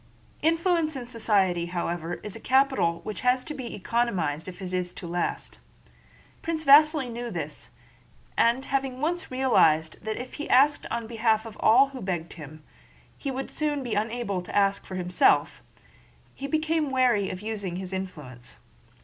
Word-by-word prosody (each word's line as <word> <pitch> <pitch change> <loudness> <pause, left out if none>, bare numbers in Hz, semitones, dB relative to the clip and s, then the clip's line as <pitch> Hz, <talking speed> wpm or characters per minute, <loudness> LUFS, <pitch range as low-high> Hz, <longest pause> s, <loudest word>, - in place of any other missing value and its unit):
Influence 330 -1 +1
in 255 -2 -5
society, 200 -7 +1
however, 175 -1 -3
is 210 - -6
a - - -8
capital 260 -11 +2
which 210 - -5
has 250 0 +2
to 305 - -6
be 255 -4 -6
economized 185 -8 -1
if 185 0 -8
it 185 -2 -6
is 180 -1 -1
to 180 - -9
last. 175 +1 -3 0.8
Prince 325 -1 -3
Vasíli 300 -1 +6
knew 240 +1 -5
this, - - -5 0.7
and 240 +4 +2
having 270 -2 -2
once 340 +5 -2
realized 160 -13 +2
that 220 0 -3
if 250 +1 -7
he - - -5
asked 285 +3 +4
on 235 -1 -3
behalf 225 -1 +1
of 225 -2 -9
all 260 +5 +5
who 265 -2 -9
begged 175 -3 -3
of - - -16
him, 155 +1 -10 0.5
he 280 - -5
would 270 0 -4
soon 295 -2 -1
be 240 -3 -3
unable 215 -3 -1
to 180 - -9
ask 200 -1 +2
for 190 - -6
himself, 180 0 +2 0.7
he 275 - -6
became 315 0 0
chary 245 -7 +2
of 185 - -6
using 205 -5 -4
his 185 0 -5
influence. 150 -10 -7
225 Hz, 165 wpm, -26 LUFS, 180-270 Hz, 0.8 s, Vasíli